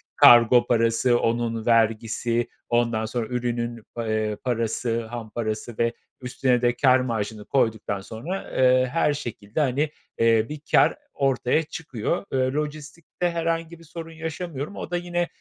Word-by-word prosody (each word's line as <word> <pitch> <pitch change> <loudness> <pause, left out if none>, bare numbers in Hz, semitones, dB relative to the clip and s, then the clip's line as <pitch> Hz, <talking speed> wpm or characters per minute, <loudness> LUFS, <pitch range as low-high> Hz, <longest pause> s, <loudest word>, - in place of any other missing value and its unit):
kargo 120 0 +7
parası, 115 +1 +3
onun 115 -1 -1
vergisi, 115 +1 +1 0.2
ondan 120 -2 +1
sonra, 115 0 -3
ürünün, 120 -1 -2 0.2
eee, 110 -2 -1
parası, 115 -1 -1
ham 115 -1 -7
parası 110 +1 -4
ve 115 0 +2 0.3
üstüne 125 0 +1
de 120 0 +3
kâr 130 0 +4
marjını 110 -3 -3
koyduktan 110 -6 0
sonra, 120 - -6
eee, 130 0 +4
her 150 -2 +2
şekilde, 115 -5 -5
hani, 145 +1 +1 0.3
eee, 115 -1 +4
bir 150 - -6
kâr - - +5 0.2
ortaya 135 +2 +1
çıkıyor. 160 - -4
Eee, 130 0 +1
lojistikte 150 +3 -3
herhangi 165 0 -2
bir - - -15
sorun 165 0 -8
yaşamıyorum. 160 0 -5
O - - -7
da 175 - +1
yine 175 0 -1
120 Hz, 140 wpm, -24 LUFS, 115-150 Hz, 0.3 s, kargo